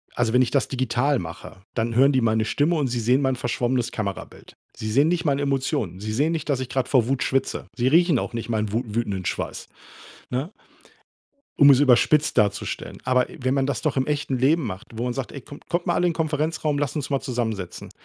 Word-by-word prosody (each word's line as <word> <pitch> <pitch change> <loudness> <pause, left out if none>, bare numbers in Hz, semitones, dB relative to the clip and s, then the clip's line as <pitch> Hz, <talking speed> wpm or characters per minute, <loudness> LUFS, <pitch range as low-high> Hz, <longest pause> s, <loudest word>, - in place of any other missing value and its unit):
also, 115 -2 0
wenn 125 - +5
ich 125 - +1
das 140 - +1
digital 130 +2 0
mache, 85 +2 -9
dann 115 0 -1
hören 135 +3 +5
die 130 - +2
meine 110 -2 +2
Stimme, 145 +9 +1
und 145 -4 +1
sie 120 -1 -2
sehen 125 +4 +2
mein 130 -1 +1
verschwommenes 120 0 -1
Kamerabild. 100 -3 -6 0.2
Sie 110 0 -4
sehen 140 +7 +4
nicht 175 0 0
meine 140 -2 +1
Emotionen. 135 - -1
Sie 110 +2 -4
sehen 145 +9 +1
nicht, 155 -2 -4
dass 140 -3 +1
ich 130 - -3
gerade 130 0 -2
vor 125 -4 +3
Wut 135 -1 0
schwitze. 135 0 -1
Sie 125 0 +1
riechen 165 -1 +4
auch - - -4
nicht 115 0 -5
meinen 110 -2 -1
wu 115 +3 0
wütenden 105 -4 -2
Schweiß, - - -4 0.6
ne? 135 - -3 1.1
Um 145 - +7
es 135 -1 +6
überspitzt 145 +2 +4
darzustellen. 105 -1 -1
Aber 125 0 +2
wenn 130 0 -1
man 135 -1 +1
das 140 - -2
doch 150 -3 0
im 130 - 0
echten 145 -3 -1
Leben 145 +5 +3
macht, 95 -4 -6
wo 115 +2 -3
man 125 - -1
sagt: 130 +1 -4
„Ey 140 - -8
kommt 145 - -13
kommt 175 0 -1
mal - - +1
alle 180 - +2
in 170 - 0
Konferenzraum, 155 -1 -1
lasst 145 0 -2
uns 145 -2 -3
mal 135 -1 +1
zusammensetzen.“ 110 -7 -4
130 Hz, 225 wpm, -24 LUFS, 115-145 Hz, 1.1 s, Um